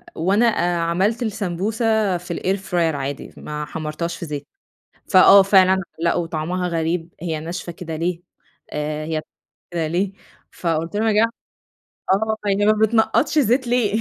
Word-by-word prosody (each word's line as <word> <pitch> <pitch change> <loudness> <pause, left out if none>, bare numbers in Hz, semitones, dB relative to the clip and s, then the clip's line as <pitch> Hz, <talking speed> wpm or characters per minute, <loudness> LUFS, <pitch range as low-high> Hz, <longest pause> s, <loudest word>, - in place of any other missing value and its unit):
وأنا 195 +8 +2
آآ 175 -6 +1
عملت 190 +8 0
السمبوسة 215 0 0
في 175 0 -6
الair 190 +2 0
fryer 165 -3 +2
عادي 140 0 -5
ما 150 0 -5
حمرتهاش 160 +2 -4
في - - -6
زيتK 145 -2 -5 0.7
فآه 195 0 +8
فعلًا 190 -1 +5 0.2
لأ 170 0 +1
وطعمها 170 +2 -2
غريب، 165 0 -1
هي 165 -3 -2
ناشفة 175 +2 -5
كده 165 -1 -7
ليه، 170 +2 -2 0.5
آآ 150 +1 -3
هي 160 0 -2
ب - - -9 0.5
كده 165 -2 -1
ليه! 185 +4 -1 0.4
فقُلت 165 +1 -2
لهم 220 +2 +1
يا 220 - +3
جما 220 +2 +4 0.8
آه 220 +3 +1
هي 200 +1 +2
ما 215 - +5
بتنقطش 220 +7 +2
زيت 250 0 +2
ليه؟. 230 -3 +1
180 Hz, 155 wpm, -21 LUFS, 165-210 Hz, 0.8 s, فآه